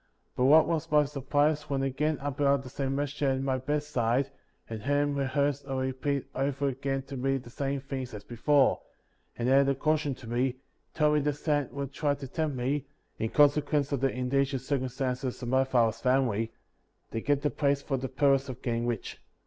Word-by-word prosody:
But 125 Hz, -, +2 dB
what 155 Hz, +3 st, +7 dB
was 165 Hz, -3 st, -1 dB
my 150 Hz, -1 st, +4 dB
sur 140 Hz, -1 st, -6 dB
prise 150 Hz, +2 st, +1 dB
when 135 Hz, -1 st, 0 dB
again 145 Hz, +3 st, 0 dB
I 145 Hz, +1 st, -2 dB
beheld 140 Hz, 0 st, +2 dB
the 130 Hz, -, -9 dB
same 135 Hz, +1 st, -2 dB
messenger 145 Hz, 0 st, -1 dB
at 130 Hz, 0 st, 0 dB
my 130 Hz, -1 st, 0 dB
bedside, 135 Hz, -2 st, 0 dB, 0.4 s
and 110 Hz, -2 st, -6 dB
heard 145 Hz, +4 st, +2 dB
him -, -, -1 dB
rehearse 140 Hz, +1 st, 0 dB
or 135 Hz, -1 st, -3 dB
repeat 130 Hz, +1 st, -1 dB
over 140 Hz, +1 st, 0 dB
again 135 Hz, +1 st, -2 dB
to 135 Hz, +1 st, -8 dB
me 135 Hz, +1 st, 0 dB
the 125 Hz, -2 st, -10 dB
same 140 Hz, +1 st, -2 dB
things 130 Hz, -4 st, -5 dB
as 105 Hz, -, -8 dB
before; 135 Hz, +3 st, +2 dB, 0.6 s
and 120 Hz, -, -1 dB
added 135 Hz, +1 st, +5 dB
a 140 Hz, -, +2 dB
cau 155 Hz, +3 st, +2 dB
tion 145 Hz, -3 st, -3 dB
to 130 Hz, -, -13 dB
me, 125 Hz, +2 st, 0 dB, 0.4 s
telling 150 Hz, -1 st, +3 dB
me -, -, -5 dB
that 150 Hz, -, +2 dB
Satan 145 Hz, -1 st, 0 dB
would 140 Hz, -1 st, -4 dB
try 145 Hz, -1 st, 0 dB
to 135 Hz, -1 st, -8 dB
tempt 150 Hz, -1 st, -2 dB
me, 135 Hz, +3 st, -1 dB, 0.3 s
(in 110 Hz, -, -1 dB
consequence 145 Hz, 0 st, +3 dB
of 140 Hz, -, 0 dB
the 135 Hz, -1 st, +2 dB
indigent 135 Hz, +1 st, 0 dB
circum 130 Hz, -2 st, -1 dB
stances 125 Hz, 0 st, -3 dB
of 120 Hz, -, -3 dB
my 130 Hz, +1 st, +4 dB
father^s 115 Hz, -4 st, +1 dB
family), 125 Hz, -4 st, +1 dB, 0.6 s
to 115 Hz, -, -3 dB
get 145 Hz, +2 st, +1 dB
the 145 Hz, -, +1 dB
plates 140 Hz, -1 st, +1 dB
for 135 Hz, -, -1 dB
the 130 Hz, 0 st, -4 dB
purpose 135 Hz, 0 st, +2 dB
of 130 Hz, -1 st, -8 dB
getting 120 Hz, -1 st, -1 dB
rich. 120 Hz, -3 st, -4 dB
135 Hz, 210 wpm, -29 LUFS, 130-145 Hz, 0.6 s, what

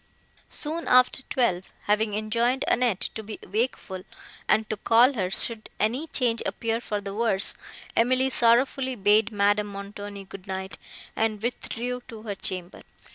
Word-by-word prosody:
Soon 320 Hz, +3 st, -3 dB
after 255 Hz, +1 st, +5 dB
twelve, 190 Hz, -8 st, 0 dB
having 210 Hz, 0 st, +1 dB
enjoined 235 Hz, +4 st, +1 dB
Annette 240 Hz, -6 st, +2 dB
to 220 Hz, -, -5 dB
be 215 Hz, 0 st, -7 dB
wakeful, 205 Hz, -3 st, -2 dB, 0.5 s
and 215 Hz, 0 st, +3 dB
to 215 Hz, -, -3 dB
call 235 Hz, +6 st, +5 dB
her, 190 Hz, -7 st, -1 dB
should 220 Hz, +3 st, 0 dB
any 245 Hz, +9 st, 0 dB
change 240 Hz, -6 st, +1 dB
appear 230 Hz, 0 st, -2 dB
for 210 Hz, -3 st, -3 dB
the 200 Hz, -1 st, -6 dB
worse, 210 Hz, -3 st, +2 dB, 0.4 s
Emily 255 Hz, +3 st, +3 dB
sorrowfully 255 Hz, +2 st, +3 dB
bade 210 Hz, +1 st, +3 dB
Madame 205 Hz, 0 st, +2 dB
Montoni 200 Hz, 0 st, -7 dB
good 195 Hz, 0 st, -11 dB
night, 190 Hz, 0 st, -5 dB, 0.4 s
and 220 Hz, -1 st, 0 dB
withdrew 245 Hz, +1 st, -3 dB
to 225 Hz, -4 st, -10 dB
her 210 Hz, -3 st, -3 dB
chamber. 185 Hz, -2 st, -3 dB
220 Hz, 145 wpm, -26 LUFS, 205-245 Hz, 0.5 s, after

